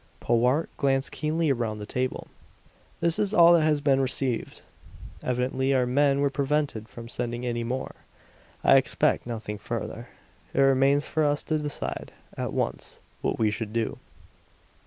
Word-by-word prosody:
Powart 125 +7 +2
glanced 135 -1 +1
keenly 155 0 0
around 115 -4 -1
the 105 - -6
table. 125 +4 -2 0.8
"This 170 +3 +1
is 210 0 +1
all 170 0 +8
that 170 - +5
has 155 -2 +2
been 135 -2 +3
received. 130 -2 -1 0.6
Evidently 130 +2 0
our 125 -1 +3
men 140 +2 +2
were 140 -1 +2
prevented 140 -5 -1
from 115 -1 -9
sending 120 +1 -3
any 120 -1 -1
more. 125 +3 -3 0.7
I - - +7
expect - - +1
nothing 110 -3 -5
further. - - -5 0.5
It 135 - +4
remains 135 +2 +4
for 155 - 0
us 145 0 +1
to 155 -1 0
decide, 150 -1 -4 0.2
at - - -3
once, - - -3 0.2
what - - -1
we 110 -2 +2
should 105 0 -4
do." 115 -1 -1
135 Hz, 155 wpm, -26 LUFS, 120-145 Hz, 0.8 s, all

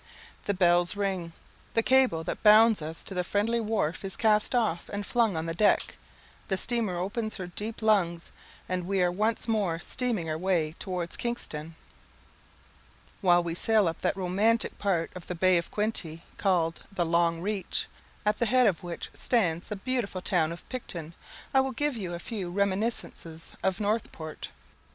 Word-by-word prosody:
The 205 - 0
bell 175 -1 +4
rings 190 -4 -2 0.4
the 225 - +3
cable 255 -12 +3
that - - -4
bound 215 -2 +7
us 160 +2 -5
to - - -4
the 180 -1 0
friendly 215 +6 0
wharf 210 -8 -1
is 195 - -2
cast 215 +1 +2
off 215 -8 0
and 205 0 -3
flung 225 -6 +1
on 160 - -2
the 165 - -2
deck 205 +5 +2 0.5
the 190 - 0
steamer 225 -5 0
opens 215 +5 -2
her 185 - -5
deep 215 +5 -6
lungs, 175 -6 +2 0.4
and 180 -1 -2
we 195 -1 +2
are 175 - +2
once 215 +5 0
more 205 -7 +1
stemming 220 -1 -1
our 155 0 -2
way 170 -4 +1
towards 180 -3 -4
Kingston. 165 -10 -4 1.5
While 175 -2 +4
we 170 -1 -2
sail 215 +2 +3
up 165 0 -3
that - - 0
romantic 200 +5 +1
part 180 -5 0
of 180 -2 -10
the 180 - -4
Bay 185 +1 +4
of 170 - -6
Quinte, 185 -7 -1 0.2
called 170 -4 +1
the 180 -3 0
"Long 170 0 +2
Reach," 200 +1 -1 0.4
at 210 0 +1
the 235 - +2
head 255 +2 +4
of 190 -7 +2
which 175 -1 -6
stands 175 -8 0
the 210 - -4
beautiful 200 -4 -2
town 165 -5 +2
of 170 - -9
Picton, 170 -10 -6 0.4
I 265 - +6
will 265 0 -2
give 295 -2 -1
you 185 -6 -4
a - - -4
few 190 0 -5
reminiscences 195 -4 -2
of 190 -2 0
Northport. 205 -7 -3
190 Hz, 175 wpm, -28 LUFS, 170-220 Hz, 1.5 s, bound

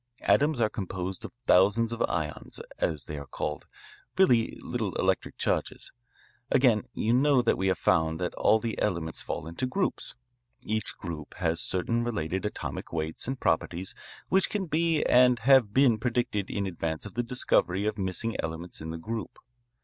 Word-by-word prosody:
Atoms 145 -2 +3
are 110 - +4
composed 95 -2 -5
of - - -7
thousands 105 +4 +4
of 115 - -4
ions, 75 -1 -3 0.2
as 75 -6 -1
they 75 -1 -5
are 70 - -9
called, 75 +4 -4 0.5
really 125 -12 +4
little - - -3
electric - - 0
charges. - - -2 0.6
Again, 125 -6 +4
you 115 - +1
know 135 0 +4
that 115 - +3
we 95 - -1
have 95 -2 +2
found 80 -2 +2
that 90 -1 -2
all 110 - +4
the 115 0 -4
elements 85 -6 -1
fall - - -4
into 85 +10 -3
groups. 190 +9 -2 0.5
Each 110 -1 -2
group 80 -4 -7
has 85 -2 0
certain 115 +6 0
related 95 -4 -2
atomic - - -6
weights 80 +3 -3
and 130 0 -3
properties 90 +3 0 0.3
which 190 +1 +2
can 205 -3 -2
be 165 0 +1
and 125 0 +5
have 120 -2 +5
been 125 -2 +4
predicted 115 -4 -1
in 100 - -2
advance 80 -4 -3
of 105 - -8
the 120 - 0
discovery 105 -5 +1
of 105 0 -1
missing 95 +4 -2
elements 80 +2 -5
in 80 - -6
the 80 - -4
group. 110 +7 -5
105 Hz, 170 wpm, -28 LUFS, 85-120 Hz, 0.6 s, and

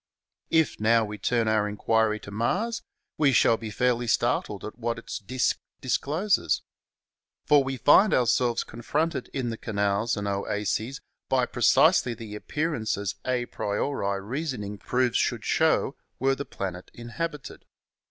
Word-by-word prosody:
If, 160 -2 +2
now, 115 +1 +4
we 105 0 -7
turn 115 +2 +1
our 105 -1 +2
inquiry 110 +1 +1
to 100 - -10
Mars, 205 - -1 0.4
we 145 -3 +5
shall 115 -2 +5
be 110 -1 -6
fairly 120 +2 0
startled - - 0
at 110 - -8
what 115 0 -2
its 115 - -6
disk 125 +5 0 0.2
discloses. 155 +9 0 0.8
For 145 -2 +5
we 135 0 -3
find 190 - +6
ourselves 120 -1 +2
confronted 155 +7 -2
in 125 -3 -3
the 115 - -5
canals 100 +1 0
and 100 0 -3
oases 105 +5 -2 0.3
by 130 -1 +3
pre 120 - -8
cisely 135 -1 +5
the 110 -3 -8
appearances 110 - -2
a 125 -1 0
priori 100 -2 -2
reasoning 110 -4 -4
proves 125 +2 +1
should - - 0
show - - +2 0.2
were 135 +1 +2
the 140 +1 -4
planet 90 -2 -6
inhabited. 140 +3 -6
120 Hz, 140 wpm, -26 LUFS, 105-135 Hz, 0.8 s, find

